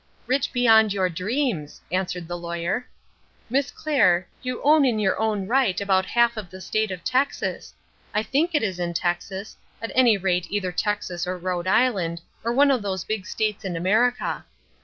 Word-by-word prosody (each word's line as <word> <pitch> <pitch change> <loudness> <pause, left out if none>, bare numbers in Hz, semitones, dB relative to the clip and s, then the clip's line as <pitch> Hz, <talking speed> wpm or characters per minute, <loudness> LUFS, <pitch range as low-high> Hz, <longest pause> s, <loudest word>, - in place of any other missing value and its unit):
"Rich 260 +1 0
beyond 220 -4 +5
your 190 -2 +1
dreams," 185 - -2
answered 180 -2 -2
the 175 - -4
Lawyer. 170 +7 -3 0.6
"Miss 275 +2 +1
Clair, 195 - +2
you 255 -1 -3
own 300 +1 +6
in 245 -5 +2
your 200 -3 +1
own 215 -3 0
right 230 -4 +2
about 190 -2 +1
half 235 -1 +2
of 205 -5 -6
the 185 +2 -10
State 215 +3 -1
of 185 -2 -6
Texas 260 +2 -1 0.4
I 210 - 0
think 310 +9 0
it 295 - +2
is 190 -4 -2
in 170 -1 -2
Texas, 185 +4 -2 0.2
at 225 - -5
any 240 -4 +5
rate 180 -2 0
either 195 -3 -1
Texas 180 -2 -2
or 185 0 -2
Rhode 180 0 -3
Island, 190 -7 +2 0.2
or 230 - 0
one 280 +3 +5
of 255 -4 +1
those 190 -3 -3
big 215 -4 -4
states 215 -1 -2
in 185 -3 -3
America. 220 +9 +1
205 Hz, 180 wpm, -24 LUFS, 180-245 Hz, 0.6 s, own